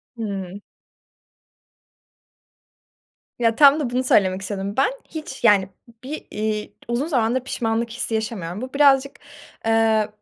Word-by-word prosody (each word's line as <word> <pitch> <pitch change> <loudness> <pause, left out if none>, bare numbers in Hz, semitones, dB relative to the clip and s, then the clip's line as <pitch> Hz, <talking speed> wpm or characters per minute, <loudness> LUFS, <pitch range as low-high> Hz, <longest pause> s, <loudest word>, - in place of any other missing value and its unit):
Hımm. 200 -3 -5 2.8
Ya, 230 -1 +2
tam 285 +2 +7
da 265 -5 -2
bunu 250 +1 -1
söylemek 190 -6 +2
istedim 195 0 -4
ben. 270 - +3 0.2
Hiç, 305 -5 -8
yani, 200 -4 +4 0.3
bir, 295 +4 -6
iii, 215 0 -3
uzun 240 +5 -1
zamandır 250 -5 +1
pişmanlık 230 -2 -2
hissi 235 -1 -3
yaşamıyorum. 210 -4 -4
Bu 255 +1 -7
birazcık, 275 -1 +3 0.5
eee, 225 -1 +3
225 Hz, 115 wpm, -22 LUFS, 205-260 Hz, 2.8 s, tam